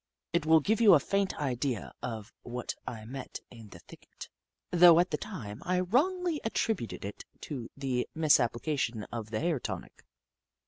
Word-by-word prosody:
It 170 -2 +1
will 160 0 +6
give 220 +9 +1
you 205 -6 +8
a - - +5
faint 195 +5 -1
idea 130 -4 -2
of 110 -3 -6
what 120 0 -5
I 110 -2 -6
met 130 +3 -7
in 115 -4 -12
the 90 - -11
thicket, - - -13 0.4
though 175 -1 +8
at 180 +1 +2
the 150 - 0
time 130 - -7
I 180 +1 +1
wrongly 320 - +1
at 225 - -3
tributed 185 - -1
it 100 - -7 0.2
to 130 -6 -6
the 130 -3 -1
misapplication 130 -5 +2
of 115 -2 -5
the 110 0 -2
hair 165 -4 +1
tonic. - - -7
145 Hz, 170 wpm, -30 LUFS, 120-180 Hz, 0.4 s, you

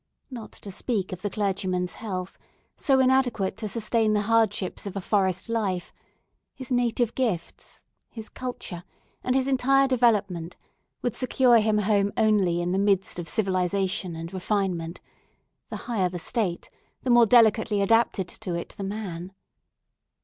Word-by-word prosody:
Not 235 -4 -8
to 200 - -10
speak 195 -2 -2
of 185 - -7
the 205 - -2
clergyman's 190 -3 -1
health, 185 -4 -5 0.4
so 270 -2 +2
inadequate 255 -6 +2
to 220 -1 -4
sustain 220 +1 +1
the 210 - +2
hardships 215 -3 0
of 200 - -6
a - - -1
forest 190 -1 0
life, 205 -6 -2 0.6
his 260 -1 -7
native 240 -1 +1
gifts, 215 -10 -4 0.2
his 220 -2 -9
culture, 245 -8 -6 0.4
and 255 - 0
his 265 0 +2
entire 270 +1 +3
development 205 -9 +1 0.5
would 245 - -1
secure 255 -2 +4
him 215 0 +2
a 210 - +1
home 200 -1 +2
only 200 -6 +2
in 175 - -1
the 190 - +1
midst 195 -3 +1
of 170 - -5
civilization 190 -1 0
and 165 +2 -7
refinement; 185 -3 -2 0.7
the - - -5
higher 200 -7 0
the 180 - -5
state 180 0 -2 0.3
the 255 - +1
more 240 -1 +6
delicately 220 -2 +4
adapted 200 -2 +2
to 180 -2 -5
it 170 - -5
the 200 - -5
man. 190 -3 -5
205 Hz, 150 wpm, -26 LUFS, 185-230 Hz, 0.7 s, more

